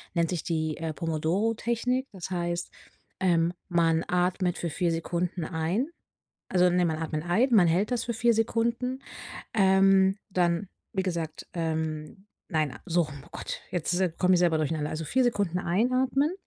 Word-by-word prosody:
nennt 170 Hz, -1 st, +2 dB
sich 175 Hz, -4 st, -2 dB
die 160 Hz, -2 st, -1 dB
äh, 165 Hz, -1 st, -3 dB
Pomodoro 165 Hz, +7 st, 0 dB
Technik. 250 Hz, +3 st, -1 dB
Das 190 Hz, -3 st, -7 dB
heißt, 175 Hz, -1 st, -2 dB, 0.5 s
ähm, 170 Hz, -2 st, +2 dB, 0.2 s
man 165 Hz, -2 st, +2 dB
atmet 180 Hz, 0 st, +1 dB
für 170 Hz, -, -3 dB
4 175 Hz, +1 st, 0 dB
Sekunden 170 Hz, +1 st, -2 dB
ein. 170 Hz, -, -1 dB, 0.6 s
Also, 180 Hz, -1 st, +4 dB
ne, 180 Hz, 0 st, +3 dB
man 160 Hz, -1 st, 0 dB
atmen 155 Hz, -1 st, -3 dB
ein, 190 Hz, +10 st, +2 dB
man 200 Hz, -6 st, +6 dB
hält 185 Hz, +7 st, +1 dB
das 245 Hz, -2 st, 0 dB
für 235 Hz, -, -2 dB
4 235 Hz, +1 st, +3 dB
Sekunden, 235 Hz, +3 st, 0 dB, 0.5 s
ähm, 195 Hz, -1 st, +5 dB
dann 175 Hz, 0 st, +1 dB, 0.3 s
wie 190 Hz, -3 st, 0 dB
gesagt, 170 Hz, -4 st, -4 dB
ähm 160 Hz, +1 st, -3 dB, 0.3 s
Nein, 155 Hz, -5 st, 0 dB
so 175 Hz, 0 st, +3 dB
oh 145 Hz, -2 st, -10 dB
Gott. -, -, -6 dB
Jetzt 175 Hz, +1 st, 0 dB, 0.2 s
komme 185 Hz, 0 st, +4 dB
ich 180 Hz, -, +4 dB
selber 170 Hz, -3 st, +3 dB
durcheinander. 155 Hz, -1 st, -1 dB
Also 155 Hz, +1 st, -4 dB
4 260 Hz, -, +2 dB
Sekunden 200 Hz, -7 st, +1 dB
einatmen, 255 Hz, -, +1 dB
180 Hz, 160 wpm, -28 LUFS, 165-205 Hz, 0.6 s, man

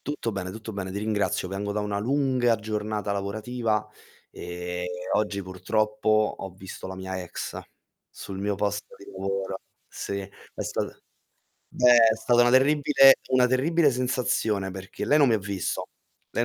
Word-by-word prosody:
Tutto 145 Hz, -6 st, -3 dB
bene, 95 Hz, -1 st, -4 dB
tutto 110 Hz, +2 st, -7 dB
bene, 95 Hz, -2 st, -4 dB
ti 95 Hz, -, -6 dB
ringrazio. 105 Hz, -2 st, 0 dB
Vengo 100 Hz, +2 st, -4 dB
da 105 Hz, -, -1 dB
una 105 Hz, -1 st, -2 dB
lunga 130 Hz, -1 st, +2 dB
giornata 105 Hz, -1 st, -3 dB
lavorativa, 105 Hz, +2 st, -2 dB, 0.4 s
ehm, 90 Hz, +1 st, -5 dB, 0.3 s
oggi 105 Hz, -2 st, 0 dB
purtroppo 105 Hz, +4 st, -1 dB, 0.3 s
ho 95 Hz, -, -5 dB
visto 95 Hz, 0 st, -9 dB
la 95 Hz, -, -6 dB
mia 95 Hz, 0 st, -4 dB
ex, 90 Hz, -, -6 dB, 0.5 s
sul 95 Hz, -, -8 dB
mio 100 Hz, +1 st, -1 dB
posto 105 Hz, +1 st, -3 dB
di -, -, -14 dB
lavoro. 95 Hz, 0 st, -3 dB, 0.3 s
Sì, 100 Hz, 0 st, -5 dB
è 100 Hz, +1 st, -9 dB
sta -, -, -2 dB, 0.9 s
Beh, 125 Hz, -1 st, +5 dB, 0.2 s
è -, -, -3 dB
stata 120 Hz, +2 st, +3 dB
una 120 Hz, -, +4 dB
terribile 135 Hz, +1 st, +6 dB
una 130 Hz, -1 st, +5 dB
terribile 145 Hz, +5 st, +3 dB
sensazione 125 Hz, -6 st, 0 dB
perché 95 Hz, +1 st, -6 dB
lei 150 Hz, -, +4 dB
non 145 Hz, -3 st, +5 dB
mi 115 Hz, -, +4 dB
ha -, -, +2 dB
visto, 100 Hz, -2 st, -3 dB, 0.4 s
lei 115 Hz, -, 0 dB
105 Hz, 155 wpm, -26 LUFS, 95-120 Hz, 0.9 s, terribile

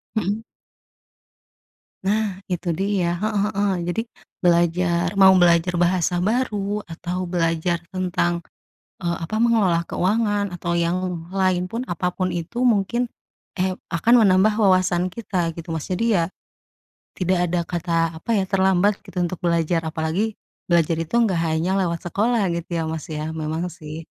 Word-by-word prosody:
Mhm. 215 Hz, +2 st, -1 dB, 1.6 s
Nah 200 Hz, -1 st, -1 dB
itu 175 Hz, 0 st, -2 dB
dia, 190 Hz, -2 st, 0 dB
heeh 210 Hz, +3 st, -1 dB
heeh. 205 Hz, -1 st, 0 dB, 0.2 s
Jadi, 195 Hz, +6 st, 0 dB, 0.4 s
belajar 170 Hz, 0 st, +2 dB
mau 190 Hz, -1 st, +7 dB
belajar 170 Hz, +1 st, +4 dB
bahasa 175 Hz, 0 st, +2 dB
baru 210 Hz, -1 st, -1 dB
atau 175 Hz, +2 st, -5 dB
belajar 170 Hz, -1 st, 0 dB
tentang, 175 Hz, -2 st, 0 dB, 0.6 s
eee, 170 Hz, -1 st, 0 dB
apa, 195 Hz, +6 st, -4 dB
mengelola 195 Hz, -8 st, +3 dB
keuangan 205 Hz, +1 st, 0 dB
atau 175 Hz, 0 st, -2 dB
yang 170 Hz, 0 st, -1 dB
lain 185 Hz, -2 st, +1 dB
pun, 230 Hz, +6 st, -4 dB
apa 175 Hz, +1 st, -1 dB
pun 185 Hz, -1 st, -1 dB
itu 175 Hz, +9 st, -3 dB
mungkin, 235 Hz, +1 st, +2 dB, 0.5 s
eh, 185 Hz, 0 st, +1 dB, 0.2 s
akan 170 Hz, +8 st, +3 dB
menambah 195 Hz, +2 st, +4 dB
wawasan 185 Hz, -3 st, +2 dB
kita 180 Hz, -5 st, -2 dB
gitu, 165 Hz, 0 st, -8 dB
Mas. 160 Hz, -, -4 dB
Jadi 225 Hz, +4 st, +1 dB
ya, 170 Hz, -3 st, +2 dB, 0.9 s
tidak 185 Hz, 0 st, +1 dB
ada 175 Hz, 0 st, +1 dB
kata 170 Hz, -1 st, -1 dB, 0.2 s
apa 165 Hz, -, -14 dB
ya, 195 Hz, -, +2 dB
terlambat 190 Hz, +1 st, +2 dB
gitu -, -, -12 dB
untuk 175 Hz, 0 st, -1 dB
belajar 170 Hz, -1 st, +1 dB
apalagi, 160 Hz, +7 st, -2 dB, 0.3 s
belajar 170 Hz, -1 st, +3 dB
itu 165 Hz, 0 st, -4 dB
nggak 195 Hz, -7 st, +2 dB
hanya 165 Hz, +4 st, 0 dB
lewat 175 Hz, -3 st, -1 dB
sekolah 215 Hz, +1 st, +1 dB
gitu 170 Hz, +1 st, -5 dB
ya -, -, 0 dB
Mas 160 Hz, -2 st, -4 dB
ya, 155 Hz, +1 st, -4 dB
memang 160 Hz, +3 st, -2 dB
sih. 160 Hz, -1 st, -8 dB
180 Hz, 145 wpm, -22 LUFS, 170-200 Hz, 1.6 s, mau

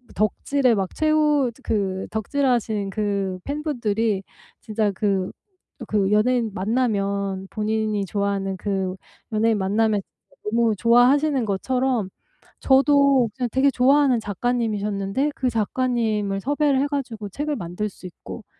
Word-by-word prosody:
덕질의 250 Hz, +4 st, +1 dB
막 190 Hz, -2 st, -2 dB
최후 300 Hz, -4 st, +2 dB
그 190 Hz, -3 st, -1 dB
덕질하신 220 Hz, -3 st, 0 dB
그 200 Hz, -3 st, -2 dB
팬분들이 230 Hz, -9 st, -1 dB, 0.4 s
진짜 215 Hz, -1 st, -1 dB
그 195 Hz, -2 st, -1 dB, 0.6 s
그 200 Hz, -2 st, +1 dB
연예인 230 Hz, +1 st, +2 dB
만나면 200 Hz, -3 st, -1 dB
본인이 215 Hz, -1 st, -1 dB
좋아하는 200 Hz, -1 st, -2 dB
그 190 Hz, -1 st, -2 dB, 0.4 s
연예인 220 Hz, 0 st, +2 dB
만나면 205 Hz, +2 st, +1 dB, 0.4 s
너무 230 Hz, +1 st, +2 dB
좋아하시는 250 Hz, +7 st, +3 dB
것처럼 240 Hz, +1 st, -1 dB, 0.5 s
저도 275 Hz, -2 st, +4 dB
그게 250 Hz, -2 st, -2 dB
되게 265 Hz, +4 st, +3 dB
좋아하는 265 Hz, -1 st, +3 dB
작가님이셨는데 210 Hz, +2 st, -1 dB
그 255 Hz, -, 0 dB
작가님을 220 Hz, -3 st, 0 dB
섭외를 285 Hz, +3 st, +1 dB
해 285 Hz, -, +1 dB
가지고 245 Hz, -7 st, -4 dB
책을 295 Hz, +8 st, -3 dB
만들 180 Hz, +2 st, -4 dB
수 190 Hz, -, -16 dB
있고 200 Hz, +4 st, -10 dB
220 Hz, 280 characters per minute, -23 LUFS, 200-260 Hz, 0.6 s, 저도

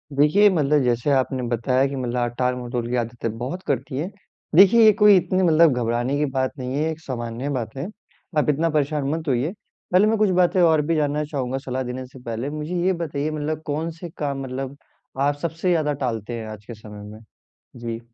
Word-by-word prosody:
देखिए, 185 Hz, +9 st, +5 dB
मतलब 150 Hz, -4 st, +2 dB
जैसे 120 Hz, +3 st, +1 dB
आपने 130 Hz, -1 st, +1 dB
बताया 125 Hz, +3 st, +1 dB
कि 140 Hz, -, -5 dB
मतलब 125 Hz, -1 st, -2 dB
आप 120 Hz, 0 st, -1 dB
टाल-मटोल 125 Hz, -1 st, -1 dB
की 125 Hz, -, -1 dB
आदतें 115 Hz, -1 st, -3 dB
बहुत 135 Hz, +10 st, -5 dB
करती 135 Hz, 0 st, -2 dB
हैं। 170 Hz, +6 st, -2 dB, 0.5 s
देखिए, 200 Hz, +5 st, +7 dB
ये 215 Hz, -, +9 dB
कोई 210 Hz, -1 st, +8 dB
इतनी 185 Hz, +1 st, +1 dB
मतलब 165 Hz, -3 st, +5 dB
घबराने 120 Hz, +3 st, 0 dB
की 150 Hz, -, +1 dB
बात 130 Hz, 0 st, +1 dB
नहीं 130 Hz, 0 st, -4 dB
है, 155 Hz, +2 st, +1 dB
एक 160 Hz, -, -7 dB
सामान्य 120 Hz, 0 st, -4 dB
बात 110 Hz, 0 st, -5 dB
है, 140 Hz, -, -3 dB, 0.5 s
आप 150 Hz, -, +2 dB
इतना 160 Hz, +3 st, +2 dB
परेशान 145 Hz, -2 st, 0 dB
मत 160 Hz, -1 st, -6 dB
होइए। 135 Hz, +5 st, +1 dB, 0.4 s
पहले 190 Hz, +4 st, +5 dB
मैं 220 Hz, 0 st, +2 dB
कुछ 210 Hz, -2 st, +3 dB
बातें 180 Hz, +1 st, +3 dB
और 160 Hz, -3 st, +5 dB
भी 165 Hz, 0 st, +1 dB
जानना 150 Hz, 0 st, 0 dB
चाहूँगा 135 Hz, -3 st, -3 dB
सलाह 130 Hz, 0 st, -2 dB
देने 130 Hz, +1 st, -5 dB
से 130 Hz, +1 st, -14 dB
पहले। 115 Hz, +4 st, -3 dB
मुझे 155 Hz, +3 st, -4 dB
ये 190 Hz, -, +3 dB
बताइए 150 Hz, -1 st, -2 dB
मतलब 155 Hz, +1 st, -3 dB
कौन 155 Hz, +3 st, -2 dB
से 175 Hz, -, -7 dB
काम 140 Hz, -2 st, -2 dB
मतलब 135 Hz, +1 st, -5 dB, 0.4 s
आप 145 Hz, +1 st, +2 dB
सबसे 170 Hz, +2 st, -2 dB
ज़्यादा 155 Hz, -4 st, +2 dB
टालते 115 Hz, -2 st, -3 dB
हैं 110 Hz, -, -6 dB
आज 105 Hz, -1 st, -10 dB
के 120 Hz, -, -8 dB
समय 105 Hz, -1 st, -11 dB
में। 110 Hz, -, -11 dB, 0.6 s
जी। 115 Hz, -1 st, -5 dB
140 Hz, 210 wpm, -23 LUFS, 125-155 Hz, 0.6 s, ये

